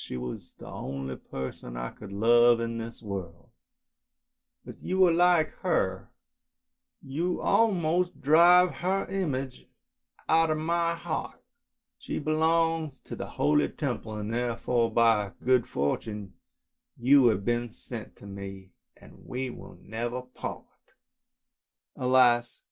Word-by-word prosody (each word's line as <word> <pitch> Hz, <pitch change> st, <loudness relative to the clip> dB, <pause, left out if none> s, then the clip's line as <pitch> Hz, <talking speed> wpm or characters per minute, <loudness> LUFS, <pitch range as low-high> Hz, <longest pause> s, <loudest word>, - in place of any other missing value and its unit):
She -, -, -6 dB
was 60 Hz, 0 st, -7 dB
the -, -, -12 dB
only 65 Hz, -1 st, -5 dB
person 65 Hz, -2 st, -7 dB
I -, -, -4 dB
could 105 Hz, -2 st, -11 dB
love 120 Hz, +3 st, +5 dB
in 115 Hz, 0 st, -3 dB
this 115 Hz, +1 st, -8 dB
world, 95 Hz, -5 st, -7 dB, 1.1 s
but -, -, -11 dB
you 185 Hz, 0 st, +3 dB
are 175 Hz, -, +4 dB
like 175 Hz, -1 st, +4 dB
her, 95 Hz, -, -1 dB, 0.9 s
you 165 Hz, +7 st, -2 dB
almost 180 Hz, -5 st, +1 dB
drive 175 Hz, +4 st, +6 dB
her 190 Hz, +2 st, 0 dB
image 140 Hz, -9 st, -3 dB, 0.6 s
out 165 Hz, 0 st, +4 dB
of 155 Hz, -, +1 dB
my 170 Hz, +1 st, 0 dB
heart. 170 Hz, -, -5 dB, 0.6 s
She -, -, -5 dB
belongs 160 Hz, -1 st, +1 dB
to -, -, -8 dB
the -, -, -6 dB
holy 75 Hz, 0 st, +3 dB
Temple, 110 Hz, -1 st, -4 dB
and 105 Hz, +1 st, -4 dB
therefore 120 Hz, -1 st, 0 dB
by 110 Hz, -3 st, +3 dB
good 125 Hz, -1 st, +2 dB
fortune 100 Hz, -, -3 dB, 0.6 s
you 130 Hz, +1 st, +5 dB
have 100 Hz, -3 st, +1 dB
been 120 Hz, 0 st, 0 dB
sent 115 Hz, 0 st, -9 dB
to^me, 100 Hz, -1 st, -9 dB, 0.4 s
we 130 Hz, 0 st, -5 dB
will -, -, -12 dB
never 120 Hz, +3 st, -4 dB
part! 125 Hz, 0 st, -7 dB, 0.5 s
" -, -, -61 dB
" -, -, -64 dB
Alas! 125 Hz, -2 st, +3 dB
120 Hz, 125 wpm, -28 LUFS, 105-160 Hz, 1.1 s, drive